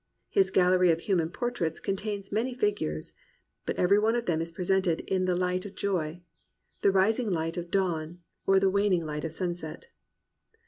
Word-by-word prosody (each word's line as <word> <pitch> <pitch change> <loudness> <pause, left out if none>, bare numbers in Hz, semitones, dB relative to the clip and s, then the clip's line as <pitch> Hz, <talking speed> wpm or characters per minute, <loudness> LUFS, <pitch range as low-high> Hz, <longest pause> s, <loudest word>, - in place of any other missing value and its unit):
His 190 -1 +3
gallery 185 -1 +4
of 165 0 +2
human 170 -5 +1
portraits 175 -6 -2
contains 200 0 -3
many 240 +5 -1
figures, 205 - -1 0.5
but - - -1
every 195 +3 +4
one 220 +2 +2
of 240 -1 -1
them 165 -2 +1
is 165 0 -4
presented 180 0 +1
in 185 -1 0
the 180 -1 +1
hght 180 0 0
of 205 -1 -9
joy, 175 -3 -2 0.3
— - - -43
the - - +5
rising 215 +5 +2
hght 165 -2 -1
of 175 -1 -5
dawn, 175 -3 -1 0.3
or 195 0 +6
the 190 0 +3
waning 195 -4 +2
light 150 0 -4
of 160 - -3
sunset. 175 - -5
185 Hz, 180 wpm, -28 LUFS, 165-200 Hz, 0.5 s, or